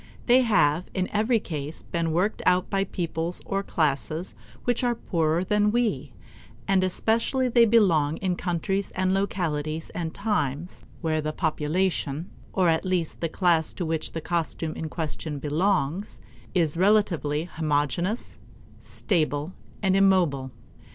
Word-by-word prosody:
They 250 +1 +6
have 180 - +2
in 185 -1 0
every 220 +3 +2
case 155 -5 -6
been 165 -1 -2
worked 180 +6 0
out 180 0 +3
by 195 0 +1
peoples 170 -1 -3
or 195 0 -1
classes 155 0 -1 0.3
which 245 0 0
are 240 -1 +2
poorer 165 -3 0
than 210 +2 +2
we, 205 - 0 0.6
and 195 -1 +3
especially 225 +7 +1
they 235 -1 +6
belong 170 -10 +3
in 185 -2 -1
countries 190 +3 -1
and 185 0 +1
localities 160 -5 -2
and 165 -2 -3
times 175 - -2 0.2
where 160 -2 0
the 155 0 -2
population, 160 0 -1 0.2
or 185 -2 +2
at 160 -1 +2
least 180 -4 -1
the 165 - -1
class 165 -2 +2
to 175 - -3
which 160 -1 -2
the 165 - -3
costume 165 -1 -2
in 160 - -5
question 155 -1 -4
belongs, 165 +4 0 0.4
is 165 -3 +2
relatively 180 -7 +2
homogeneous, 160 - -1 0.4
stable, 155 -3 -1 0.3
and 190 -1 +3
immobile. 180 -9 +3
175 Hz, 140 wpm, -26 LUFS, 155-195 Hz, 0.6 s, They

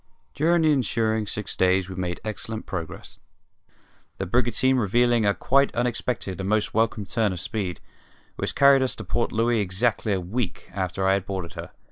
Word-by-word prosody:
During 165 +3 +2
the 155 - +4
ensuing 110 -5 0
six 105 -1 -4
days 95 0 +2
we 95 - -7
made 90 -1 -3
excellent 110 +1 -5
progress, 85 -4 -6 1.0
the 95 - -3
brigantine 125 +5 +2
revealing 120 0 +2
a 100 - +2
quite 140 +1 +2
unexpected 120 -5 -2
and 95 0 -3
most 110 0 +1
welcome 110 -1 +1
turn 105 +2 0
of 90 - -4
speed, 90 -3 -3 0.6
which - - -3
carried 140 -1 +6
us 130 - +1
to - - -6
Port 120 - -1
Louis 115 +1 +1
exactly 105 +2 0
a 95 - 0
week 90 +1 -4
after 95 0 -1
I 95 - +4
had 100 -1 -1
boarded 95 -4 -4
her. - - -7
110 Hz, 175 wpm, -25 LUFS, 95-120 Hz, 1.0 s, carried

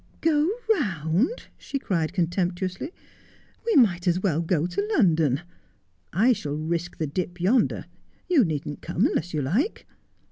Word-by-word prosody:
' - - -30
Go 310 0 +3 0.2
round! 195 - 0
' - - -36
she 275 - -4
cried 170 - -1
contemptuously; 180 - -1 0.4
' - - -31
we 460 - +3
might 185 -9 +4
as 175 +1 +3
well 170 -5 +1
go 165 -1 +1
to 190 +4 -2
London. 160 - +3 0.7
I 225 +9 +4
shall 145 -9 -4
risk 170 +2 -3
the 160 - -1
dip 175 +4 -4
yonder. 210 +9 +2 0.4
You 340 -8 +5
needn't 150 -4 -3
come 170 - 0
unless 175 +2 0
you 150 -3 -1
like. 220 - 0
175 Hz, 155 wpm, -25 LUFS, 160-215 Hz, 0.7 s, You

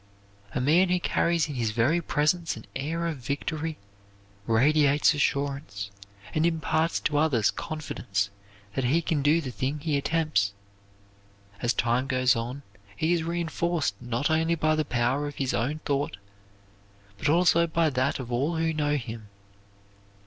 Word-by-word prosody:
A - - +1
man 165 +8 +4
who 180 0 +2
carries 170 -2 +1
in 150 - -5
his 120 -4 -1
very 120 +11 +2
presence 155 0 0
an 110 - -11
air 165 +5 -2
of 165 -3 -2
victory, 150 +5 -3 0.7
radiates 145 +6 +4
assurance, 140 -9 -2 0.4
and 155 - +1
imparts 165 0 +1
to 145 -2 +1
others 130 -9 +3
confidence 105 -10 -3 0.4
that 130 - -1
he 160 +7 +2
can 155 -2 0
do 150 +4 +3
the 130 -5 -5
thing 135 +4 -2
he 150 0 -1
attempts. 150 -9 +1 1.1
As 120 - +2
time 120 +2 +1
goes 130 -2 +3
on, 120 +5 -4 0.3
he 160 +2 +2
is 170 - +1
reenforced 170 - -1
not 120 +4 -1
only 160 +1 +2
by 155 -1 +2
the 155 0 +1
power 125 +3 0
of 145 - -7
his 135 -2 -1
own 150 +7 -1
thought, 140 -6 -1 1.0
but 150 - 0
also 170 +1 +4
by 160 -1 +1
that 130 +1 0
of 125 -3 -7
all 140 +8 0
who 160 0 0
know 150 -1 +1
him. 115 -5 -5
145 Hz, 155 wpm, -27 LUFS, 125-160 Hz, 1.1 s, man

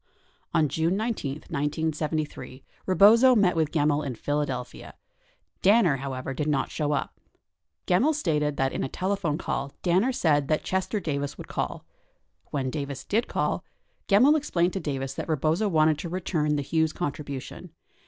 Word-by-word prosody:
63 - - +5
On 155 - +3
June 160 +6 0
19, 220 - -2
1973, 150 -1 -3 0.2
Rebozo 225 +7 +6
met 195 -6 +3
with 160 -2 +1
Gemmill 150 -1 +1
in 135 -4 -4
Philadelphia, 140 -1 -3 0.7
Dan 215 +5 +5
ner, 150 -7 +2
however, 135 0 -4
did 150 +3 -2
not 140 -3 0
show 150 -1 -1
up. 145 - -3 0.7
Gemmill 250 - +3
stated 150 - 0
that 135 0 0
in - - -2
a 135 - -3
telephone 185 -4 -1
call 140 -5 -3
Danner 185 +8 +3
said 150 - +2
that 155 0 0
Chester 190 +3 -1
Davis 145 -5 -3
would - - -9
call. - - -4 0.6
When 130 -3 -2
Davis 140 -2 -4
did 225 +4 0
call, - - -1 0.4
Gemmill 250 +10 +6
explained 180 - 0
to 195 - -2
Davis 135 -5 -3
that - - -6
Rebozo 160 +7 +1
wanted 155 -3 +3
to 170 - -5
return 165 -4 -1
the 145 - -1
Hughes 160 +2 0
contribution. 145 -5 -5
155 Hz, 160 wpm, -26 LUFS, 145-185 Hz, 0.7 s, Rebozo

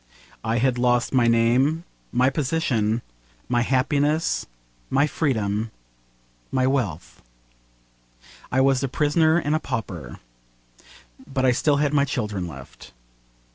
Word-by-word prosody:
I 110 +1 0
had 125 +1 +1
lost 120 0 +2
my 125 -3 +4
name, 125 +8 +3 0.3
my 125 +2 +3
position, 125 -7 0 0.4
my 120 -1 +1
happiness, 145 +5 +1 0.4
my 140 +2 +3
freedom, 110 -8 -1 0.8
my 130 -1 +1
wealth. 115 - -2 1.3
I 130 - +3
was 135 -1 +3
a 135 - 0
prisoner 155 +4 +2
and 150 -3 0
a 155 - +2
pauper. 90 - -5 1.1
But 130 -1 0
I 130 - +5
still 145 +4 +2
had 145 0 +1
my 140 -1 +3
children 105 -10 -3
left. 65 -4 -12
130 Hz, 120 wpm, -23 LUFS, 115-145 Hz, 1.3 s, I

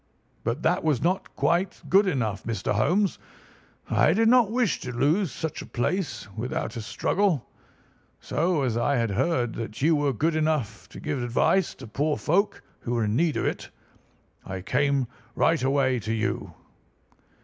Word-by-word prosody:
But 120 +7 -2
that 170 +3 +2
was 150 -6 +2
not 185 +3 -1
quite 175 +3 0
good 195 +1 +5
enough, 115 - -1
Mr. 110 -4 -2
Holmes. 175 - +1 0.7
I 160 - +3
did 225 +3 +3
not 245 -4 +5
wish 235 - +1
to 125 - -5
lose 150 - +1
such 160 -2 -4
a - - -8
place 170 - -2
without 120 +3 -3
a 115 - -4
struggle, 150 - 0 0.7
so, 165 -2 0
as 120 -4 0
I 140 +4 +1
had 115 -4 0
heard 120 - 0
that 115 -2 -6
you 160 +1 +5
were 145 -1 +1
good 155 +7 0
enough 155 -9 -1
to - - -10
give 145 -4 -3
advice 125 +9 +1
to 130 - -10
poor 145 +8 -1
folk 195 +7 0 0.2
who 120 - -3
were 115 - +1
in 105 0 0
need 160 +2 +2
of - - -1
it, - - -3 0.7
I 95 -1 -6
came 140 +5 +1 0.3
right 165 -4 +2
away 130 -1 +2
to 110 +1 -3
you." 110 -1 -2
140 Hz, 170 wpm, -26 LUFS, 115-170 Hz, 0.7 s, good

